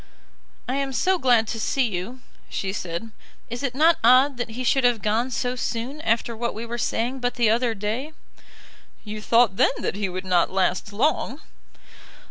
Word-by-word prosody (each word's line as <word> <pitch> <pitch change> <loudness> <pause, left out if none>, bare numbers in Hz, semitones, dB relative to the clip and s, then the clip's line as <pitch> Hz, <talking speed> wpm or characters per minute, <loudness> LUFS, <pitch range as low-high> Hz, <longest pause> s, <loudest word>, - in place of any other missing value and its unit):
"I 255 +2 -1
am 275 -1 -2
so 370 +7 +2
glad 240 -5 +3
to 225 - -3
see 260 +3 +1
you," 220 +6 -5 0.3
she 190 -1 -3
said. 185 +4 -5 0.4
"Is 240 - -4
it 265 -3 -2
not 320 +3 +4
odd 255 +3 +5
that 245 -1 -3
he 240 +3 -5
should 265 +1 +2
have 240 -4 +2
gone 225 +4 +1
so 250 0 -2
soon 250 +4 -4
after 230 -2 0
what 235 0 -3
we 225 +2 -5
were 235 +1 -5
saying 245 +4 -1
but 245 -1 -1
the 235 -3 +3
other 235 0 +1
day?" 220 +9 -3 0.9
"You 215 0 -6
thought 230 -3 +3
then - - +4
that - - -2
he 200 -2 -2
would 185 +1 -5
not 180 -2 +2
last 190 +1 0
long." 265 +4 0
235 Hz, 185 wpm, -24 LUFS, 215-255 Hz, 0.9 s, odd